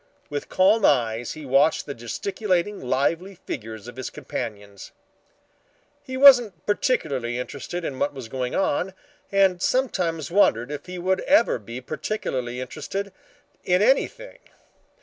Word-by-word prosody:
With 145 -1 -4
calm 200 +4 +4
eyes 120 -5 +2
he 155 -1 -9
watched 140 +4 +3
the 140 - -5
gesticulating 190 - -2
lively 165 +9 0
figures 110 - -7
of 120 - -10
his 130 - -4
companions. 105 -8 -7 1.1
He 260 0 -6
wasn't 245 - +6
particularly 140 - 0
interested 145 +7 -5
in 130 -4 -4
what 145 - +1
was 130 -5 -8
going 125 +1 -3
on, 190 +1 0 0.4
and 195 -3 +3
sometimes 175 - 0
wondered 140 - +3
if 150 +3 -6
he 180 0 -6
would 185 +2 0
ever 255 - +4
be 115 +4 -8
particularly 130 - -3
interested 195 +9 -5 0.5
in 180 +2 +3
anything. - - +1
160 Hz, 130 wpm, -24 LUFS, 125-195 Hz, 1.1 s, wasn't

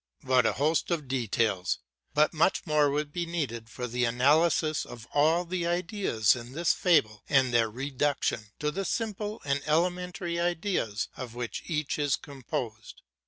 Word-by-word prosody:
What 130 -4 +3
a - - +1
host 155 +4 +1
of 160 -5 -1
details! 115 -7 0 0.4
but 150 +2 +4
much 165 +5 +2
more 150 -3 +3
would 145 +1 -2
be 175 -1 -2
needed 125 -10 -3
for 125 +2 -5
the 125 +1 -1
analysis 155 +6 +3
of 120 -2 -10
all 160 +4 +3
the 175 0 -2
ideas 175 - +1
in 120 +1 -9
this 170 +3 +2
fable 110 - +2
and 130 -3 +3
their 115 -1 +3
reduction 135 -2 -1
to 150 0 -1
the 195 +5 -3
simple 215 -1 -3
and 140 0 0
elementary 175 +1 0
ideas 175 - -1
of 120 -3 -7
which 120 -1 -4
each 150 -2 -1
is 145 -3 +2
composed. 120 -5 -6
145 Hz, 160 wpm, -28 LUFS, 120-170 Hz, 0.4 s, but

